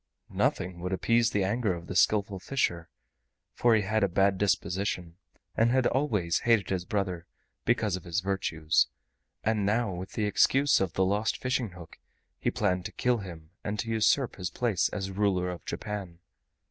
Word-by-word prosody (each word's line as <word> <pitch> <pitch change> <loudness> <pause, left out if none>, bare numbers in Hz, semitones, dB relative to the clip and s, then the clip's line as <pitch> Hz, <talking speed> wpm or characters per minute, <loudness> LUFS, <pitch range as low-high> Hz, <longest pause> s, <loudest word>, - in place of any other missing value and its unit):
Nothing 90 -1 0
would 90 +2 -3
appease 115 +4 +2
the 105 -4 0
anger 105 -1 0
of 85 0 -9
the 90 - -6
Skillful 100 0 +2
Fisher, 90 -7 -1 0.6
for 120 -2 +4
he 105 - +2
had 110 +2 +1
a - - +4
bad 95 +1 +2
disposition, 95 -3 -1 0.4
and 115 +1 +3
had 130 0 +2
always 105 - +1
hated 115 -6 +2
his 90 -2 -1
brother 95 -5 -2 0.4
because 110 -5 +1
of 95 - -8
his 85 +2 -1
virtues, 85 -5 +1 0.6
and 110 -1 +1
now 110 0 +1
with 90 +2 -7
the 110 - -1
excuse 135 +6 +3
of 95 -4 -1
the 95 - +2
lost 105 +3 0
fishing 125 -6 -1
hook 85 -2 -12 0.4
he - - 0
planned 90 -1 0
to - - -4
kill 125 -2 +1
him 85 -5 -9
and 105 +1 -3
to 115 +2 -3
usurp 115 +4 +2
his 90 -3 -3
place 105 -7 0
as 95 -2 -4
ruler 95 -2 +1
of 85 -5 -8
Japan. 100 -5 -5
100 Hz, 175 wpm, -28 LUFS, 90-110 Hz, 0.6 s, for